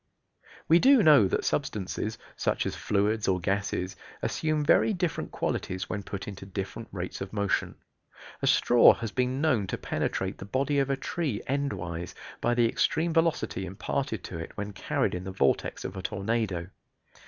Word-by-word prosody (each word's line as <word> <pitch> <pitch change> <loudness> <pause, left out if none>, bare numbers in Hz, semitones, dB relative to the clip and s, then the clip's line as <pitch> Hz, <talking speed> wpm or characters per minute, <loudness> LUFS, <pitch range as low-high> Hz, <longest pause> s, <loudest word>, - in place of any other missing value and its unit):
We 165 +2 +6
do 265 -1 +6
know 145 - +7
that - - -1
substances, 105 +2 -2 0.2
such - - 0
as - - -2
fluids 105 +1 0
or 95 -1 +2
gases, 95 0 -1 0.3
assume 155 -1 0
very 215 - +4
different 175 -3 -2
qualities 95 +1 -3
when 105 - -2
put 100 0 -6
into 100 -2 -7
different 95 +3 -5
rates 90 -2 -5
of 95 - -5
motion. 100 -2 0 0.7
A - - 0
straw 120 - +6
has 115 -3 -5
been 130 +1 0
known 120 -11 +2
to - - -3
penetrate 95 +1 -2
the - - -7
body 140 +6 0
of 135 0 +1
a 135 - +1
tree 150 - -2
endwise 90 -12 -3 0.3
by 120 0 +2
the 120 -1 +4
extreme 160 +7 +1
velocity 165 - +1
imparted 105 +4 -3
to 85 - -6
it 80 - -8
when 105 0 -4
carried - - -1
in 90 - -3
the 95 - -5
vortex 70 -8 0
of 95 - -5
a 95 - -4
tornado. 95 -3 -2
105 Hz, 170 wpm, -28 LUFS, 95-140 Hz, 0.7 s, know